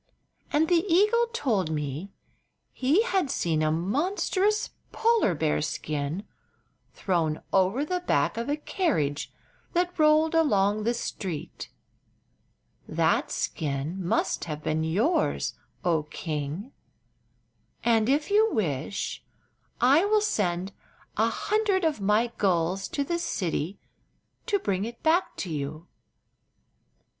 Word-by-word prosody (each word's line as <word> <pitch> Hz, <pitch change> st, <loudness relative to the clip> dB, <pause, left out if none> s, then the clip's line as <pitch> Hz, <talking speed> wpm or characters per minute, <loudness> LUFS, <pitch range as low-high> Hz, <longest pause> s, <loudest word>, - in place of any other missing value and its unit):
And 310 Hz, +2 st, +3 dB
the 345 Hz, -1 st, +3 dB
eagle 425 Hz, +7 st, +4 dB
told 220 Hz, -, 0 dB
me 150 Hz, +4 st, -3 dB, 0.6 s
he 290 Hz, -, +3 dB
had 380 Hz, -, 0 dB
seen 165 Hz, -, 0 dB
a 155 Hz, 0 st, +2 dB
monstrous 370 Hz, -, 0 dB, 0.2 s
polar 455 Hz, -, +2 dB
bear 150 Hz, 0 st, 0 dB
skin 150 Hz, +3 st, -3 dB, 0.7 s
thrown 165 Hz, -5 st, -1 dB
over 195 Hz, +9 st, +3 dB
the 360 Hz, +3 st, -1 dB
back 360 Hz, -, +1 dB
of 230 Hz, +3 st, -3 dB
a 290 Hz, -, +1 dB
carriage 160 Hz, -, -1 dB, 0.4 s
that 355 Hz, 0 st, 0 dB
rolled 310 Hz, +1 st, +4 dB
along 210 Hz, -10 st, +2 dB
the 235 Hz, +1 st, +1 dB
street. 185 Hz, -8 st, -5 dB, 1.2 s
That -, -, +1 dB
skin 150 Hz, +5 st, -3 dB
must 175 Hz, -, 0 dB
have 155 Hz, -2 st, -5 dB
been 155 Hz, +1 st, 0 dB
yours, 215 Hz, -, +1 dB, 0.3 s
oh 165 Hz, -3 st, +3 dB
king, 155 Hz, -, -5 dB, 1.1 s
and 225 Hz, -1 st, +3 dB
if 295 Hz, +7 st, +1 dB
you 435 Hz, +2 st, +4 dB
wish 170 Hz, 0 st, -2 dB, 0.6 s
I 275 Hz, +8 st, +5 dB
will 425 Hz, +1 st, +4 dB
sent 190 Hz, -, 0 dB, 0.4 s
an -, -, +3 dB
hundred 420 Hz, -3 st, 0 dB
of 305 Hz, -9 st, 0 dB
my 210 Hz, +4 st, +2 dB
gulls 185 Hz, 0 st, +1 dB
to 285 Hz, -, -2 dB
the 340 Hz, +4 st, -2 dB
city 180 Hz, -, -2 dB, 0.7 s
to 415 Hz, -4 st, +2 dB
bring 195 Hz, -, -1 dB
it 235 Hz, +2 st, -7 dB
back 335 Hz, +4 st, +2 dB
to 180 Hz, -, -4 dB
you." 155 Hz, +2 st, -4 dB
210 Hz, 120 wpm, -27 LUFS, -, 1.2 s, I